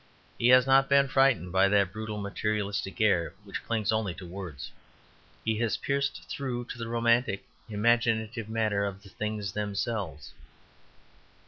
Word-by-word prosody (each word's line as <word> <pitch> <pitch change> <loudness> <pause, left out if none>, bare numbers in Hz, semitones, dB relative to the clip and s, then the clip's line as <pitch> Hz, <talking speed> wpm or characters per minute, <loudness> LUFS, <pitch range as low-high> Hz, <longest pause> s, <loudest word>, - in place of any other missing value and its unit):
He 120 - +3
has 125 0 +7
not 135 0 +4
been 140 0 +5
frightened 135 -9 +3
by 95 +1 +4
that 100 -2 +2
brutal 110 -1 -5
materialistic 105 0 -2
air 95 -6 +2
which - - -6
clings 110 -3 0
only 110 -5 -1
to 90 - -9
words; 90 -6 -7 0.7
he 110 -1 0
has 115 -2 0
pierced 140 0 -1
through 125 -3 -4
to 120 - -7
the 115 - -4
romantic, 115 -2 +1 0.2
imaginative 115 0 +1
matter 110 -2 0
of 100 0 -4
the 100 - -13
things 105 0 -3
themselves. 100 -5 -3
110 Hz, 145 wpm, -28 LUFS, 100-120 Hz, 0.7 s, has